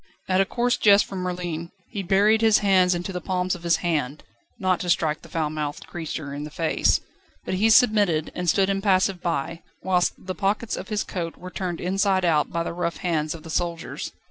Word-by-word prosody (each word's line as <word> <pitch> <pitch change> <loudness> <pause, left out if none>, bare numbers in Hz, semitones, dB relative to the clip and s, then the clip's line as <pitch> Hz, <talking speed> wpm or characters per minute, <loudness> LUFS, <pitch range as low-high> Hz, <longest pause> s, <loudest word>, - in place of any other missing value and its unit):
At 185 0 +3
a - - +2
coarse 240 +4 0
jest 205 -1 +5
from 195 - -6
Merlin, 175 -2 -4 0.2
he 200 - -3
buried 205 +4 +3
his 220 -2 +4
nails 185 -2 +4
into 175 +2 -4
the 180 - -4
palms 185 0 -1
of 180 - -6
his 170 -1 +3
hand, 150 -4 -1 0.3
not 185 -2 +1
to 180 - -4
strike 155 -3 +1
the - - -14
foulmouthed 150 -2 -3
creature 155 -4 -6
in 145 +1 -5
the 150 - -6
face. 160 +1 +1 0.5
But - - -3
he 205 +4 +3
submitted, 205 - +4
and 180 -1 -1
stood 190 +3 +3
impassive 195 -2 +1
by, 165 0 -2 0.2
whilst 180 -1 +2
the 185 - -6
pockets 200 +5 -1
of - - -7
his 210 -1 -1
coat 170 -3 -5
were 185 0 -9
turned 180 -3 -4
inside 190 0 +1
out 155 -3 +2
by 170 0 -1
the - - -4
rough 170 -1 -2
hands 155 -3 -1
of 160 - -11
the 160 - -8
soldiers. 170 0 -3
180 Hz, 205 wpm, -24 LUFS, 165-195 Hz, 0.5 s, jest